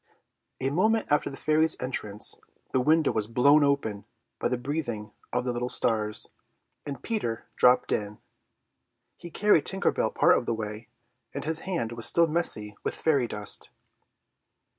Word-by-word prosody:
A 135 Hz, +1 st, -1 dB
moment 215 Hz, +6 st, +1 dB
after 150 Hz, -, +2 dB
the 135 Hz, -, -9 dB
fairy's 155 Hz, +1 st, +2 dB
entrance 105 Hz, -5 st, -3 dB, 0.3 s
the 130 Hz, -, +2 dB
window 155 Hz, +3 st, +3 dB
was 105 Hz, -1 st, -1 dB
blown 140 Hz, +6 st, +5 dB
open 140 Hz, -8 st, 0 dB, 0.3 s
by -, -, +1 dB
the 125 Hz, -, 0 dB
breathing 120 Hz, -5 st, -4 dB, 0.2 s
of 125 Hz, +1 st, -1 dB
the 125 Hz, -, 0 dB
little 120 Hz, +1 st, -2 dB
stars, 105 Hz, -3 st, 0 dB, 0.5 s
and 140 Hz, -1 st, -6 dB
Peter 120 Hz, -, -2 dB
dropped 125 Hz, 0 st, +4 dB
in. 105 Hz, 0 st, -2 dB, 1.0 s
He -, -, -10 dB
had 165 Hz, -, -13 dB
carried 205 Hz, -7 st, +4 dB
Tinker 195 Hz, +1 st, +1 dB
Bell -, -, 0 dB
part -, -, +4 dB
of -, -, -9 dB
the 115 Hz, -, 0 dB
way, 110 Hz, +1 st, -6 dB, 0.5 s
and -, -, -3 dB
his 160 Hz, +1 st, 0 dB
hand 165 Hz, -12 st, -1 dB
was 115 Hz, -1 st, -2 dB
still 170 Hz, -, +4 dB
messy 150 Hz, -11 st, 0 dB
with -, -, -1 dB
the -, -, -14 dB
fairy 140 Hz, -6 st, +3 dB
dust. 105 Hz, -2 st, -4 dB
125 Hz, 165 wpm, -27 LUFS, 110-155 Hz, 1.0 s, blown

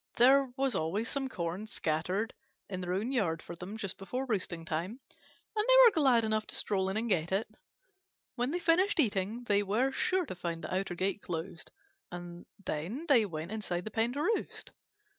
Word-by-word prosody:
There 265 Hz, +2 st, +5 dB
was 270 Hz, -1 st, +1 dB
always 195 Hz, +9 st, -1 dB
some 270 Hz, -1 st, -2 dB
corn 180 Hz, +1 st, -3 dB
scattered 180 Hz, +5 st, -1 dB, 0.3 s
in 185 Hz, -2 st, -4 dB
their 180 Hz, 0 st, -2 dB
own 210 Hz, +7 st, -1 dB
yard 185 Hz, -11 st, +1 dB
for 170 Hz, -, -8 dB
them 180 Hz, +5 st, -7 dB
just 200 Hz, -4 st, -4 dB
before 250 Hz, +7 st, -3 dB
roosting 185 Hz, -8 st, -2 dB
time, 170 Hz, +10 st, -3 dB, 0.6 s
and 425 Hz, 0 st, +1 dB
they -, -, +8 dB
were 465 Hz, -, +8 dB
glad 265 Hz, -, +4 dB
enough 215 Hz, 0 st, 0 dB
to -, -, -7 dB
stroll 190 Hz, -2 st, 0 dB
in 195 Hz, -, -2 dB
and 230 Hz, +2 st, -1 dB
get 175 Hz, -5 st, +1 dB
it. 200 Hz, +5 st, +1 dB, 0.9 s
When 245 Hz, 0 st, -1 dB
they 340 Hz, -, 0 dB
finished 355 Hz, +3 st, +3 dB
eating 215 Hz, -2 st, +1 dB
they 205 Hz, -3 st, +3 dB
were 220 Hz, +7 st, +1 dB
sure 370 Hz, +6 st, +1 dB
to 265 Hz, -, -5 dB
find 170 Hz, -2 st, -4 dB
the -, -, -4 dB
outer 185 Hz, -1 st, -1 dB
gate 195 Hz, +3 st, -1 dB
closed, 170 Hz, 0 st, -5 dB, 0.4 s
and 175 Hz, 0 st, -8 dB, 0.2 s
then 190 Hz, -, -3 dB
they 235 Hz, -7 st, +6 dB
went 160 Hz, +1 st, -5 dB
inside 190 Hz, -5 st, -2 dB
the 215 Hz, -, -6 dB
pen 225 Hz, +3 st, +1 dB
to 290 Hz, +2 st, -1 dB
roost. 445 Hz, +6 st, -2 dB
205 Hz, 195 wpm, -31 LUFS, 180-255 Hz, 0.9 s, they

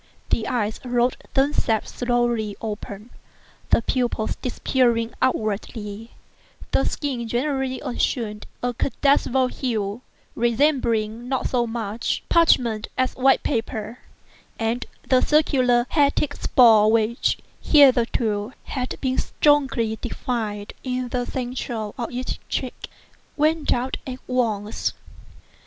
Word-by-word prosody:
The 220 Hz, -, +1 dB
eyes 220 Hz, -4 st, -1 dB
rolled 245 Hz, 0 st, +1 dB, 0.2 s
themselves 270 Hz, -5 st, +1 dB
slowly 240 Hz, -4 st, 0 dB
open, 210 Hz, 0 st, -6 dB, 0.6 s
the -, -, +3 dB
pupils 240 Hz, -4 st, -1 dB
disappearing 240 Hz, -2 st, +1 dB
upwardly; 215 Hz, -2 st, -2 dB, 0.6 s
the 270 Hz, -, +2 dB
skin 255 Hz, -5 st, -2 dB
generally 260 Hz, +2 st, -1 dB
assumed 230 Hz, -4 st, -2 dB, 0.2 s
a 245 Hz, 0 st, 0 dB
cadaverous 260 Hz, 0 st, +1 dB
hue, 220 Hz, -3 st, -2 dB, 0.3 s
resembling 235 Hz, -2 st, +1 dB
not 265 Hz, -1 st, 0 dB
so 240 Hz, -2 st, +1 dB
much 225 Hz, -1 st, -3 dB
parchment 240 Hz, -10 st, +3 dB
as 255 Hz, 0 st, +1 dB
white 265 Hz, +1 st, +3 dB
paper; 225 Hz, -2 st, -3 dB, 0.6 s
and 230 Hz, +2 st, -1 dB, 0.2 s
the 255 Hz, -1 st, +4 dB
circular 255 Hz, -5 st, +3 dB
hectic 285 Hz, -1 st, +2 dB
spots 220 Hz, -6 st, +5 dB
which, 225 Hz, +1 st, +1 dB, 0.2 s
hitherto, 240 Hz, -6 st, +3 dB
had 255 Hz, -1 st, -4 dB
been 260 Hz, -1 st, 0 dB
strongly 270 Hz, -7 st, +2 dB
defined 220 Hz, -4 st, -3 dB
in 255 Hz, -1 st, -2 dB
the 245 Hz, 0 st, -1 dB
centre 250 Hz, -1 st, -4 dB, 0.2 s
of 235 Hz, -, -4 dB
each 250 Hz, +1 st, -4 dB
cheek, -, -, -4 dB, 0.5 s
went 310 Hz, +1 st, +2 dB
out 255 Hz, +2 st, 0 dB
at 255 Hz, -1 st, -5 dB
once. 220 Hz, -4 st, -1 dB
245 Hz, 110 wpm, -23 LUFS, 225-260 Hz, 0.6 s, spots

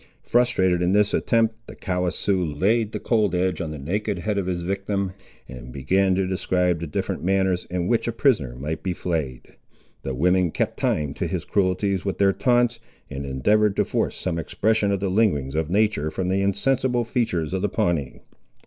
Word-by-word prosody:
Frustrated 95 Hz, -7 st, +2 dB
in 90 Hz, +1 st, +2 dB
this 105 Hz, 0 st, +3 dB
attempt, 115 Hz, 0 st, +1 dB
the -, -, -10 dB
callous 90 Hz, -2 st, -2 dB
Sioux 95 Hz, -3 st, +1 dB
laid 100 Hz, +8 st, +1 dB
the -, -, -4 dB
cold 105 Hz, -6 st, +1 dB
edge 90 Hz, -1 st, 0 dB
on 80 Hz, -, -3 dB
the 75 Hz, -, -6 dB
naked 100 Hz, +8 st, -2 dB
head 100 Hz, +3 st, -1 dB
of 95 Hz, -, -3 dB
his 90 Hz, -2 st, -2 dB
victim, 100 Hz, +1 st, -2 dB, 0.4 s
and 60 Hz, 0 st, -10 dB
began 95 Hz, +9 st, +1 dB
to 95 Hz, 0 st, +1 dB
describe 90 Hz, -2 st, 0 dB
the 85 Hz, -, -4 dB
different 75 Hz, -, -3 dB
manners, 95 Hz, -1 st, +1 dB
in 90 Hz, -1 st, -2 dB
which 115 Hz, +2 st, +1 dB
a -, -, +1 dB
prisoner 110 Hz, -, +1 dB
might 75 Hz, +5 st, -4 dB
be 95 Hz, -, -2 dB
flayed. 80 Hz, -9 st, -4 dB, 0.4 s
The 65 Hz, -, -4 dB
women 90 Hz, +5 st, +2 dB
kept -, -, -2 dB
time 75 Hz, -2 st, 0 dB
to -, -, -3 dB
his -, -, -3 dB
cruelties 95 Hz, 0 st, 0 dB
with 95 Hz, -, -2 dB
their 100 Hz, -1 st, +3 dB
taunts, 120 Hz, 0 st, +2 dB, 0.3 s
and 70 Hz, 0 st, -5 dB
endeavoured 105 Hz, +10 st, +2 dB
to -, -, +2 dB
force -, -, -1 dB
some 85 Hz, -3 st, -2 dB
expression 105 Hz, +5 st, +1 dB
of 100 Hz, -1 st, -1 dB
the 100 Hz, -, 0 dB
lingerings 90 Hz, -11 st, +1 dB
of 80 Hz, 0 st, -1 dB
nature 100 Hz, -6 st, +1 dB
from 90 Hz, +3 st, -3 dB
the 95 Hz, +1 st, +1 dB
insensible 120 Hz, +5 st, +1 dB
features 110 Hz, -, -1 dB
of 95 Hz, -, -1 dB
the 105 Hz, -, 0 dB
Pawnee. 85 Hz, -, -1 dB
95 Hz, 195 wpm, -23 LUFS, 85-105 Hz, 0.4 s, this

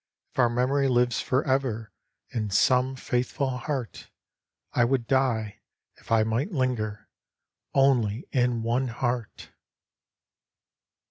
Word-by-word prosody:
If -, -, -9 dB
our 120 Hz, -2 st, +5 dB
memory 130 Hz, +4 st, +1 dB
lives 120 Hz, -2 st, +2 dB
for 130 Hz, +1 st, +1 dB
ever 125 Hz, -5 st, 0 dB, 0.4 s
In 110 Hz, -3 st, -2 dB
some 125 Hz, +6 st, +3 dB
faithful 130 Hz, +2 st, -1 dB
heart? 125 Hz, -, -5 dB, 0.3 s
— -, -, -48 dB
I 120 Hz, -, +3 dB
would 120 Hz, 0 st, +1 dB
die, 115 Hz, -5 st, 0 dB, 0.4 s
if -, -, -16 dB
I 115 Hz, -1 st, +5 dB
might 115 Hz, -, -1 dB
linger 120 Hz, -, -2 dB, 0.7 s
Only 125 Hz, -4 st, +2 dB
in 125 Hz, -3 st, +1 dB
one 120 Hz, +3 st, 0 dB
heart 120 Hz, -1 st, -3 dB
125 Hz, 120 wpm, -26 LUFS, 115-130 Hz, 0.7 s, our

